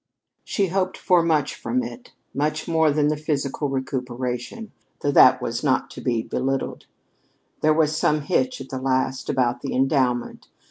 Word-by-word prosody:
She 195 Hz, -3 st, 0 dB
hoped 185 Hz, +1 st, -1 dB
for 180 Hz, -3 st, +3 dB
much 155 Hz, -4 st, +1 dB
from 255 Hz, +1 st, -2 dB
it 250 Hz, 0 st, -9 dB, 0.2 s
much 150 Hz, +2 st, -1 dB
more 160 Hz, -2 st, +3 dB
than 150 Hz, 0 st, +2 dB
the 155 Hz, -, +1 dB
physical 145 Hz, -1 st, -2 dB
recuperation, 130 Hz, -, -4 dB, 0.3 s
though 145 Hz, -, +1 dB
that 130 Hz, -2 st, +6 dB
was 115 Hz, +2 st, -3 dB
not 130 Hz, -3 st, +1 dB
to -, -, -9 dB
be 120 Hz, -3 st, 0 dB
belittled. 135 Hz, +3 st, -3 dB, 0.7 s
There 155 Hz, -, +4 dB
was 155 Hz, -1 st, +2 dB
some 150 Hz, -1 st, +2 dB
hitch, 250 Hz, -, 0 dB
at -, -, -9 dB
the 130 Hz, -1 st, -5 dB
last, 130 Hz, 0 st, -1 dB
about 125 Hz, -2 st, +1 dB
the -, -, -3 dB
endowment. 130 Hz, -2 st, 0 dB
145 Hz, 160 wpm, -23 LUFS, 130-160 Hz, 0.7 s, that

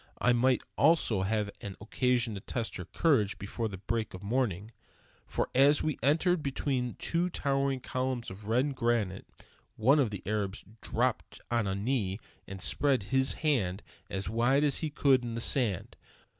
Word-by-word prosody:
I 125 Hz, -, +3 dB
might 125 Hz, 0 st, +2 dB, 0.2 s
also 140 Hz, -, +4 dB
have 105 Hz, +1 st, -1 dB
an 100 Hz, -2 st, -6 dB
occasion 120 Hz, +1 st, 0 dB
to 100 Hz, -, -5 dB
test 115 Hz, +2 st, -4 dB
her 90 Hz, -, -6 dB
courage 110 Hz, -, +1 dB
before 110 Hz, +3 st, -3 dB
the 100 Hz, -3 st, -7 dB
break 110 Hz, +2 st, -3 dB
of 95 Hz, -, -10 dB
morning, 110 Hz, -3 st, -1 dB, 0.6 s
for -, -, -1 dB
as 140 Hz, +3 st, +5 dB
we 155 Hz, -3 st, -1 dB
entered 160 Hz, +6 st, +2 dB
between 135 Hz, -3 st, -2 dB
two 170 Hz, +2 st, -1 dB
towering 135 Hz, -4 st, 0 dB
columns 130 Hz, -3 st, -3 dB
of 100 Hz, +2 st, -10 dB
red 125 Hz, +6 st, +1 dB
granite, 115 Hz, -7 st, -1 dB, 0.5 s
one 135 Hz, +7 st, +4 dB
of 130 Hz, -6 st, +2 dB
the 100 Hz, -2 st, -7 dB
Arabs 105 Hz, -1 st, -2 dB, 0.2 s
dropped -, -, -1 dB
on 115 Hz, -3 st, +1 dB
a 95 Hz, -, -1 dB
knee 100 Hz, -2 st, -1 dB, 0.3 s
and 95 Hz, -2 st, -7 dB
spread 135 Hz, -6 st, +2 dB
his 130 Hz, 0 st, +4 dB
hand 100 Hz, -10 st, +1 dB, 0.3 s
as 95 Hz, 0 st, -4 dB
wide 120 Hz, +7 st, +2 dB
as 145 Hz, -2 st, +2 dB
he 160 Hz, -, -1 dB
could 140 Hz, -3 st, +3 dB
in 115 Hz, -1 st, -4 dB
the -, -, -2 dB
sand. 115 Hz, -6 st, +1 dB
120 Hz, 170 wpm, -30 LUFS, 105-135 Hz, 0.6 s, as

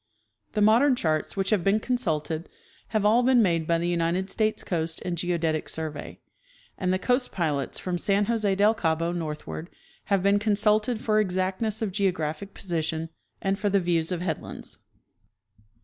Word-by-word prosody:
The 210 Hz, -, +2 dB
modern 245 Hz, +6 st, +5 dB
charts 155 Hz, -3 st, -1 dB
which 195 Hz, +1 st, 0 dB
have 205 Hz, -5 st, +2 dB
been 195 Hz, +3 st, +3 dB
consulted 165 Hz, -10 st, -1 dB, 0.4 s
have 215 Hz, -2 st, 0 dB
all 225 Hz, +4 st, +5 dB
been 250 Hz, 0 st, +4 dB
made 165 Hz, -4 st, +1 dB
by 170 Hz, -, +3 dB
the 170 Hz, +1 st, -1 dB
United 175 Hz, +2 st, 0 dB
States 215 Hz, -1 st, 0 dB
Coast 160 Hz, -2 st, -2 dB
and 180 Hz, -1 st, -1 dB
Geodetic 165 Hz, -2 st, -1 dB
Survey, 155 Hz, -2 st, -5 dB, 0.6 s
and 185 Hz, -1 st, -1 dB
the 185 Hz, -, +2 dB
coast 250 Hz, +5 st, 0 dB
pilots 150 Hz, -6 st, -1 dB
from 180 Hz, -1 st, -3 dB
San 200 Hz, +3 st, +2 dB
Jose 215 Hz, -3 st, +1 dB
del 205 Hz, +3 st, +4 dB
Cabo 165 Hz, -5 st, 0 dB
northward 160 Hz, 0 st, -5 dB, 0.4 s
have 195 Hz, -3 st, +1 dB
been 200 Hz, +1 st, +4 dB
con 205 Hz, 0 st, +1 dB
suited 215 Hz, +2 st, +3 dB
for 215 Hz, -1 st, +2 dB
exactness 195 Hz, +3 st, 0 dB
of 205 Hz, -, -1 dB
geographic 185 Hz, -2 st, -2 dB
position 165 Hz, -2 st, -2 dB, 0.3 s
and 195 Hz, +1 st, 0 dB
for 205 Hz, 0 st, +1 dB
the 200 Hz, 0 st, +3 dB
views 170 Hz, -2 st, 0 dB
of 175 Hz, -2 st, -2 dB
headlands. 165 Hz, -4 st, -5 dB
185 Hz, 165 wpm, -26 LUFS, 165-210 Hz, 0.6 s, modern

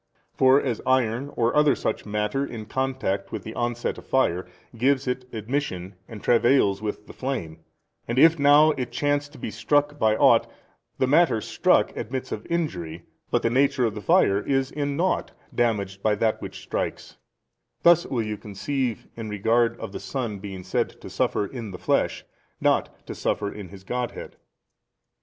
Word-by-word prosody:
For 130 Hz, 0 st, +5 dB
75 130 Hz, -, 0 dB
as 115 Hz, -, -5 dB
iron 130 Hz, +1 st, +1 dB
or 120 Hz, 0 st, +1 dB
other 150 Hz, -1 st, +5 dB
such -, -, -3 dB
matter 105 Hz, +6 st, -1 dB
in 115 Hz, -6 st, -6 dB
contact 130 Hz, -4 st, -2 dB
with -, -, -5 dB
the -, -, -7 dB
onset 120 Hz, 0 st, -2 dB
of -, -, -16 dB
fire 90 Hz, -10 st, +1 dB, 0.3 s
gives 130 Hz, +3 st, +2 dB
it 125 Hz, 0 st, -3 dB
admission 110 Hz, -5 st, -3 dB
and 110 Hz, -3 st, -10 dB
travails 120 Hz, -4 st, +3 dB
with 105 Hz, -1 st, -4 dB
the -, -, -12 dB
flame: 105 Hz, -13 st, -4 dB, 0.5 s
and 120 Hz, -, -2 dB
if 165 Hz, +3 st, +6 dB
now 145 Hz, +2 st, +6 dB
it 125 Hz, -4 st, -4 dB
chance 145 Hz, +3 st, 0 dB
to 145 Hz, -, -15 dB
be 115 Hz, -, -5 dB
struck 145 Hz, +3 st, +1 dB
by 110 Hz, -1 st, +3 dB
ought, -, -, +4 dB, 0.5 s
the -, -, +2 dB
matter 145 Hz, -3 st, +4 dB
[struck] -, -, +2 dB
admits 130 Hz, +4 st, -4 dB
of 105 Hz, -, -5 dB
injury, 90 Hz, -, -3 dB, 0.3 s
but -, -, +1 dB
the 115 Hz, -, +2 dB
nature 130 Hz, 0 st, +3 dB
of 110 Hz, -, 0 dB
the 105 Hz, -, -6 dB
fire 100 Hz, 0 st, +4 dB
is 135 Hz, +2 st, 0 dB
in 145 Hz, -1 st, -2 dB
nought 185 Hz, +3 st, 0 dB, 0.2 s
damaged 100 Hz, -5 st, 0 dB
by 105 Hz, 0 st, +2 dB
that 110 Hz, +1 st, 0 dB
which -, -, -8 dB
strikes; -, -, -4 dB, 0.7 s
thus 170 Hz, 0 st, +6 dB
will 120 Hz, -4 st, -1 dB
you 105 Hz, -1 st, -4 dB
conceive 120 Hz, +4 st, -3 dB
in 115 Hz, -2 st, -6 dB
regard 115 Hz, +3 st, +1 dB
of -, -, -6 dB
the -, -, -6 dB
Son 115 Hz, -7 st, -4 dB
being 95 Hz, -2 st, -7 dB
said 95 Hz, -, -2 dB
to -, -, -10 dB
suffer 105 Hz, -, 0 dB
in 115 Hz, 0 st, -7 dB
the 95 Hz, -, -7 dB
flesh, -, -, 0 dB, 0.3 s
not -, -, 0 dB
to -, -, -6 dB
suffer 100 Hz, -1 st, -2 dB
in 100 Hz, -4 st, -8 dB
His 95 Hz, +1 st, -12 dB
Godhead. 125 Hz, +4 st, -4 dB
120 Hz, 180 wpm, -25 LUFS, 105-135 Hz, 0.7 s, if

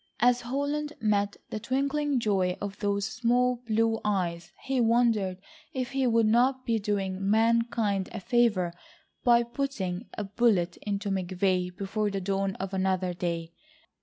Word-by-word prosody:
As 245 Hz, +1 st, +4 dB
Holland 285 Hz, +4 st, -2 dB
met 205 Hz, -2 st, +1 dB
the 215 Hz, -, -3 dB
twinkling 275 Hz, +3 st, 0 dB
joy 190 Hz, -5 st, +1 dB
of 200 Hz, -1 st, -5 dB
those 200 Hz, -1 st, 0 dB
small 245 Hz, +2 st, +1 dB
blue 225 Hz, 0 st, +2 dB
eyes, 180 Hz, -5 st, -1 dB
he 265 Hz, -2 st, 0 dB
wondered 225 Hz, -5 st, +2 dB, 0.4 s
if 255 Hz, -1 st, -3 dB
he 270 Hz, -1 st, +1 dB
would 230 Hz, -1 st, +3 dB
not 255 Hz, +4 st, +3 dB
be 230 Hz, -2 st, +1 dB
doing 195 Hz, -2 st, -1 dB
mankind 225 Hz, -3 st, +2 dB
a 220 Hz, -, -5 dB
favour 205 Hz, -5 st, +2 dB, 0.5 s
by 240 Hz, -1 st, +5 dB
putting 235 Hz, -6 st, -3 dB
a 210 Hz, -, -2 dB
bullet 195 Hz, -4 st, +1 dB
into 200 Hz, 0 st, -3 dB
McVay 185 Hz, -1 st, 0 dB
before 205 Hz, +2 st, -1 dB
the 195 Hz, -1 st, -2 dB
dawn 195 Hz, 0 st, -1 dB
of 195 Hz, +1 st, -5 dB
another 185 Hz, -1 st, 0 dB
day. 170 Hz, -1 st, -3 dB
210 Hz, 145 wpm, -28 LUFS, 190-240 Hz, 0.5 s, by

